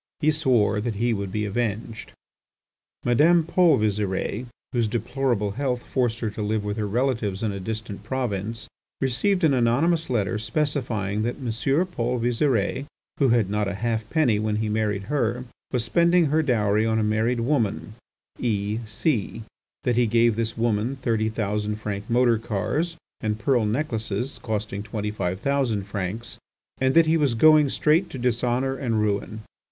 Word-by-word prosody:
He 155 0 +3
swore 120 -9 +2
that 115 -1 -2
he 120 +3 +1
would 100 -2 -3
be 105 +1 -1
avenged. 110 +1 -3 0.9
Madame 160 +8 +4
Paul 170 0 +4
Visire, 105 +2 -1 0.3
whose 120 -3 +1
deplorable 120 -1 -1
health 125 +1 -2
forced 120 -3 -1
her 110 -3 -1
to 105 - -6
live 105 0 -1
with 105 +1 -3
her 105 -1 -1
relatives 110 -3 -1
in 110 - 0
a 100 - -5
distant 110 0 -5
province, 115 -2 -3 0.3
received 180 - +1
an 155 -3 +5
anonymous 140 +8 +2
letter 110 -3 0
specifying 110 -4 -1
that 120 +2 -1
M. 125 -5 -4 0.3
Paul 125 -9 -2
Visire, 120 +1 0 0.3
who 135 - +4
had 115 -4 +3
not 105 +1 -1
a 100 - -3
half 110 +1 -2
penny 130 -10 +2
when 110 0 0
he 110 0 -1
married 105 -2 0
her, 125 0 -1 0.3
was 125 -3 0
spending 170 +5 +4
her 160 - +4
dowry 110 -6 +2
on 110 0 +1
a 110 - +2
married 110 +3 +1
woman, 115 -5 0 0.5
E— 105 -2 -1
C—, 110 0 -1 0.4
that 120 -2 +1
he 120 -1 +4
gave 115 0 +3
this 115 0 -2
woman 115 +2 0
thirty 115 -4 0
thousand 105 -1 -2
franc 105 -1 -5
motor 120 -1 +3
cars, 150 - -2 0.2
and 110 -1 -1
pearl 115 -1 +1
necklaces 115 -1 -2
costing 105 -2 -3
twenty 105 0 -4
five 95 -3 -3
thousand 135 -7 0
francs, 100 +4 -5 0.4
and 130 +2 +2
that 165 0 +7
he 160 +1 +3
was 140 -6 +1
going 150 +3 +6
straight 160 +7 +2
to - - -7
dishonour 125 +2 0
and 120 -5 -1
ruin. 105 +1 -1
115 Hz, 165 wpm, -24 LUFS, 105-130 Hz, 0.9 s, that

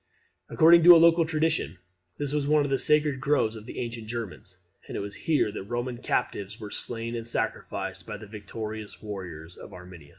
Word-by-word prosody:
According 170 +2 +6
to 175 0 +11
local 165 0 +5
tradition, 160 - 0 0.4
this 145 -1 -3
was 145 -2 0
one 150 0 +4
of 140 - -3
the 135 - +2
sacred 150 -3 +3
groves 140 -6 +1
of 110 +1 -10
the - - -8
ancient 115 -2 -5
Germans, 110 -5 -7 0.3
and - - -5
it - - -2
was 100 0 -5
here 150 - 0
that - - -16
the - - -5
Roman 120 +4 -4
captives 105 -4 -2
were 105 -1 -8
slain 115 0 -4
in 115 -1 -4
sacrifice 115 - -3
by - - -7
the 110 - -11
victorious 105 +1 -7
warriors 90 -5 -8
of - - -12
Arminius. 90 -5 -12
115 Hz, 195 wpm, -27 LUFS, 105-150 Hz, 0.4 s, to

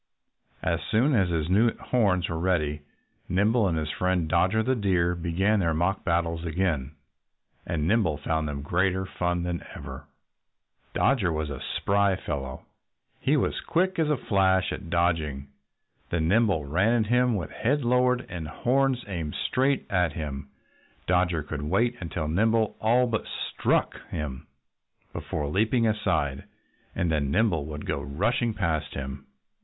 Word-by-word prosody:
As - - +1
soon 130 +7 +3
as 95 -7 +3
his 80 -3 -1
new 110 +6 +3
horns 100 -8 +1
were 80 -1 -3
ready 75 -5 0 0.5
Nimble 105 +4 +3
and 85 -3 0
his 75 -1 -2
friend 90 -3 0
Dodger 95 +7 +2
the 130 +3 +1
Deer 90 -6 +1
began 90 +5 +1
their 85 -4 +1
mock 90 +4 0
battles 85 -1 0
again. 80 -5 -1 0.7
And 80 -2 -1
Nimble 95 -7 +2
found 80 +1 -1
them 70 -1 -4
greater 95 +4 +1
fun 90 -1 -1
than 90 -1 -3
ever. 70 +1 -8 0.9
Dodger 115 -10 +2
was 80 -2 -2
a 70 - -6 0.2
spry 100 -1 +2
fellow. 70 -6 -5 0.5
He - - +2
was - - 0
quick 185 +2 0
as 160 -2 +2
a 150 - +2
flash 95 -4 +2
at 85 - -7
dodging. 80 -5 0 0.6
When 80 -2 0
Nimble 100 -6 +2
ran 105 +10 +2
at 110 - -5
him 125 -1 +3
with 85 -7 -4
head 140 +3 0
lowered 125 +1 +2
and 85 -3 -6
horns 130 - +1
aimed 85 -6 -4
straight 135 +1 +1
at 90 -5 +2
him 70 -3 -5 0.6
Dodger 90 -3 +1
could 75 0 -5
wait 105 +11 +1
until 80 -3 -3
Nimble 110 +6 +2
all 120 +3 +4
but 115 -3 -2
struck - - -1
him, 70 -4 -5 0.7
before 75 -2 -3
leaping 110 - +2
aside. 80 -11 0 0.5
And 85 -2 0
then 75 -3 0
Nimble 85 -3 +1
would 75 -1 -6
go - - -2
rushing 105 - 0
past 80 -6 -1
him. 70 0 -6
90 Hz, 150 wpm, -27 LUFS, 80-110 Hz, 0.9 s, all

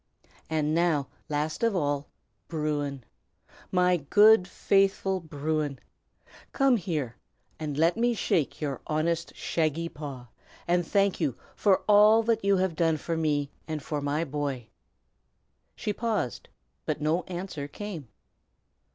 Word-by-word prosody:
"And 155 -1 0
now, 160 -5 +1 0.2
last 150 +1 -2
of 230 -3 +2
all, 145 -4 0 0.4
Bruin! 145 -4 -2 0.7
my 180 -1 +3
good, 205 +6 +5
faithful 195 0 +2
Bruin! 155 -2 -2 0.8
come 270 -3 +4
here 155 - -3 0.4
and 150 -3 -4
let 165 +3 +3
me 240 +1 +2
shake 155 -9 0
your 140 -3 -3
honest, 165 +2 -1
shaggy 165 +1 -1
paw, 135 -6 -8 0.4
and 175 0 +2
thank 200 -1 +2
you 145 -8 -1 0.2
for 195 -3 +3
all 210 +2 +7
that 225 -1 +1
you 200 -1 +3
have 185 -3 0
done 165 -1 +2
for 165 +2 -3
me 150 -3 0 0.2
and 155 -3 -4
for 150 -1 -3
my 145 +3 0
boy." 140 -5 -3 1.1
She 210 - -2
paused, 210 - -2 0.4
but 155 - -1
no 155 +4 +1
answer 175 -5 -5
came. 170 - -7
160 Hz, 130 wpm, -28 LUFS, 145-190 Hz, 1.1 s, all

